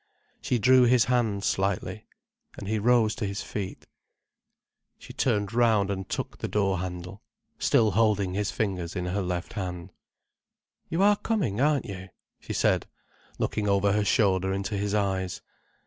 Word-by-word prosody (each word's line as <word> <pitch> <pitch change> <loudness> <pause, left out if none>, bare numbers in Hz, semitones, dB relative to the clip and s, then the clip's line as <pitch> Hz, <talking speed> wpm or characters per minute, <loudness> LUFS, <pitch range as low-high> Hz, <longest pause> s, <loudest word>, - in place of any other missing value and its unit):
She 125 - 0
drew 130 +3 +5
his 120 -1 +4
hand 115 -5 0
slightly. 95 -2 -1 0.5
And 100 - -7
he 110 +1 0
rose 115 -1 +3
to 110 - -4
his 100 +1 -4
feet. 100 -3 -6 1.1
She - - -12
turned 105 -4 0
round 110 -4 +3
and 95 -2 -4
took - - -4
the - - -3
door 95 -3 0
handle, 90 +2 -6 0.4
still 110 -2 +3
holding 105 -2 +2
his 105 +1 -1
fingers 90 -5 -2
in 90 - -2
her 95 +3 -1
left 90 -1 -3
hand. 90 -3 -5 1.0
"You 170 +4 +1
are 205 0 +5
coming, 160 - -1
aren't 145 -1 +2
you?" 95 -2 -7 0.3
she - - -9
said, - - +1 0.5
looking 105 -1 -1
over 100 0 +3
her 105 +1 +2
shoulder 95 -3 +2
into 100 +2 -2
his 100 +1 -1
eyes. 95 -3 -1
100 Hz, 155 wpm, -27 LUFS, 95-115 Hz, 1.1 s, drew